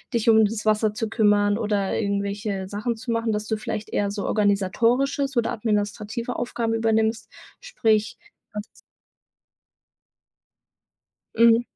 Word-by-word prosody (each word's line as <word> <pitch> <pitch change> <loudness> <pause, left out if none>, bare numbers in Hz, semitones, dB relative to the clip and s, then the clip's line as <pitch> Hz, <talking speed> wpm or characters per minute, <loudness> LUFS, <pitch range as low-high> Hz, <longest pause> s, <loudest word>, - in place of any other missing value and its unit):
dich 230 -1 0
um 220 0 +6
das 210 +1 -3
Wasser 215 0 +2
zu 225 0 -2
kümmern 205 -2 +3
oder 205 -3 0
irgendwelche 200 -1 -2
Sachen 210 +4 -3
zu 235 +1 -5
machen“, 230 -1 0
dass 210 +1 -3
du 220 - 0
vielleicht 215 0 -5
eher 205 - 0
so 200 0 -4
Organisatorisches 230 +7 +1
oder 235 - +1
administrative 215 +2 -2
Aufgaben 235 -1 -2
übernimmst, 225 0 +1 0.3
sprich 225 - 0 0.4
was 210 +3 -11 2.6
Mhm. 230 0 +6
220 Hz, 120 wpm, -24 LUFS, 205-230 Hz, 2.6 s, um